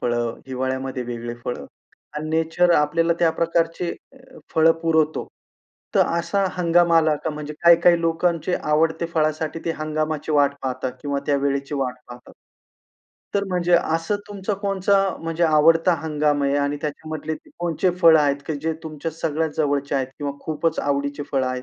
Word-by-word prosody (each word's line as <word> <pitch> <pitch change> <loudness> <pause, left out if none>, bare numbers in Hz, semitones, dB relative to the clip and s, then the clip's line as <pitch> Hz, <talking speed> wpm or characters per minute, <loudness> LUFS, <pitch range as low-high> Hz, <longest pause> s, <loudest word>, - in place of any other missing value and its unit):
फळं, 120 -1 -1
हिवाळ्यामध्ये 130 0 -3
वेगळे 120 -1 -5
फळं 125 - -4 0.5
आणि 155 +1 -4
नेचर 165 +2 +2
आपल्याला 165 +3 +2
त्या 170 -2 +4
प्रकारचे 165 +1 0 0.2
अ, - - -20 0.4
फळं 160 0 +6
पुरवतो. 160 -2 +1 0.7
तर - - +5
असा 170 +4 0
हंगामाला 170 -2 +4
का 160 - 0
म्हणजे 150 0 -6
काही-काही 170 0 +6
लोकांचे 170 +1 0
आवडते 160 +2 +1
फळासाठी 155 0 0
ते 165 - 0
हंगामाची 155 0 -2
वाट 140 -1 +3
पाहतात 130 -1 -3
किंवा 140 -1 -1
त्या 145 - +2
वेळेची 140 +1 -1
वाट 130 -3 -1
पाहतात. 120 0 -12 1.0
तर 200 0 +1
म्हणजे 180 -1 0
असं 165 +3 +1
तुमचा 205 0 -3
कोणचा 195 0 +2 0.2
म्हणजे 165 +1 -3
आवडता 165 +2 +4
हंगाम 150 -2 0
आहे? 140 0 +1
आणि 145 0 0
त्याच्यामधले 155 +1 -4
ते - - -16
कोणचे 175 +1 0
फळं 165 -2 +7
आहेत, 140 -1 +2
की 160 - -2
जे 160 0 0
तुमच्या 155 +1 -5
सगळ्यात 160 0 -1
जवळचे 145 -2 0
आहेत 135 -2 +1
किंवा 145 -1 -3
खूपच 160 +1 -2
आवडीचे 140 0 -1
फळं 135 -2 +1
आहेत 130 0 -3
155 Hz, 155 wpm, -22 LUFS, 140-165 Hz, 1.0 s, फळं